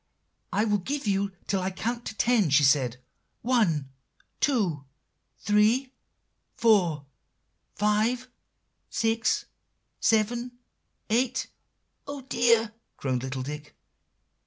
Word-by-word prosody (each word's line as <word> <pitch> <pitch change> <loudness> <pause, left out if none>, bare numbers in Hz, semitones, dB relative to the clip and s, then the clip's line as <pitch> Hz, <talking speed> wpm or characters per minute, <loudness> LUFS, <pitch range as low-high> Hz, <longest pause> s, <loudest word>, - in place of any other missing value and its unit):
"'I 215 - +1
will 210 -2 +2
give 280 +9 -3
you 200 -1 +1
till 195 -2 0
I 185 - -1
can 220 +5 -2
count 235 -2 -8
ten,' 225 -8 +3
she 145 +2 +5
said. 130 -3 +3 0.5
'One 180 - +1 0.5
two 190 - +1 0.5
three 220 +6 +2 0.6
four 180 -10 +3 0.7
five 215 +5 +1 0.6
six 225 0 +1 0.5
seven 235 +3 +1 0.6
eight'" 245 +2 +1 0.6
"Oh, 285 -1 -5
dear!" 230 -3 +2 0.2
groaned 130 -2 -1
little 130 0 -4
Dick. 150 +2 -7
210 Hz, 100 wpm, -27 LUFS, 155-240 Hz, 0.7 s, she